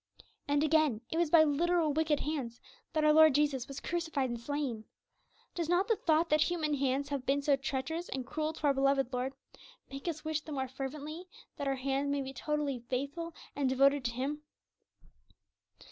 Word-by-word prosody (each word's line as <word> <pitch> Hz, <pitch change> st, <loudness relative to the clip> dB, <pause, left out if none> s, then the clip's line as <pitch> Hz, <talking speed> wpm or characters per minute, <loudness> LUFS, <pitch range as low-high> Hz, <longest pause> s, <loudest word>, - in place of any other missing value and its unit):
And 285 Hz, +1 st, +2 dB
again, 310 Hz, -7 st, +3 dB
it 320 Hz, -, -1 dB
was 340 Hz, -2 st, +2 dB
by 320 Hz, 0 st, +7 dB
literal 315 Hz, +1 st, +2 dB
'wicked 310 Hz, -1 st, +1 dB
hands' 265 Hz, -6 st, -3 dB, 0.3 s
that 310 Hz, -2 st, +1 dB
our 305 Hz, 0 st, +5 dB
Lord 315 Hz, -3 st, +7 dB
Jesus 285 Hz, -4 st, +1 dB
was 275 Hz, 0 st, -7 dB
crucified 320 Hz, -7 st, -2 dB
and 240 Hz, -, -4 dB
slain. 260 Hz, -5 st, -3 dB, 0.7 s
Does 335 Hz, -2 st, -3 dB
not 360 Hz, +3 st, +3 dB
the 455 Hz, -, +3 dB
thought 325 Hz, -3 st, +2 dB
that 305 Hz, 0 st, +4 dB
human 310 Hz, -2 st, +1 dB
hands 275 Hz, 0 st, 0 dB
have 280 Hz, -3 st, -2 dB
been 280 Hz, +2 st, +1 dB
so 280 Hz, -1 st, +4 dB
treacherous 275 Hz, +5 st, -3 dB
and 260 Hz, -1 st, -4 dB
cruel 310 Hz, +4 st, -2 dB
to 315 Hz, -, -13 dB
our 285 Hz, -, +5 dB
beloved 275 Hz, -1 st, +1 dB
Lord 255 Hz, +2 st, -1 dB, 0.6 s
make 275 Hz, +4 st, -7 dB
us 315 Hz, -2 st, -3 dB
wish 315 Hz, -1 st, -1 dB
the 305 Hz, -, -8 dB
more 265 Hz, -1 st, -2 dB
fervently 290 Hz, +6 st, -6 dB, 0.3 s
that 285 Hz, -, -3 dB
our 270 Hz, -, +1 dB
hands 270 Hz, +2 st, -1 dB
may 280 Hz, -1 st, 0 dB
be 265 Hz, 0 st, -7 dB
totally 295 Hz, -3 st, -2 dB
faithful 280 Hz, +7 st, -4 dB, 0.2 s
and 280 Hz, -2 st, +1 dB
devoted 275 Hz, +1 st, +4 dB
to 235 Hz, -, +1 dB
Him? 280 Hz, +5 st, -3 dB
285 Hz, 190 wpm, -32 LUFS, 270-315 Hz, 0.7 s, by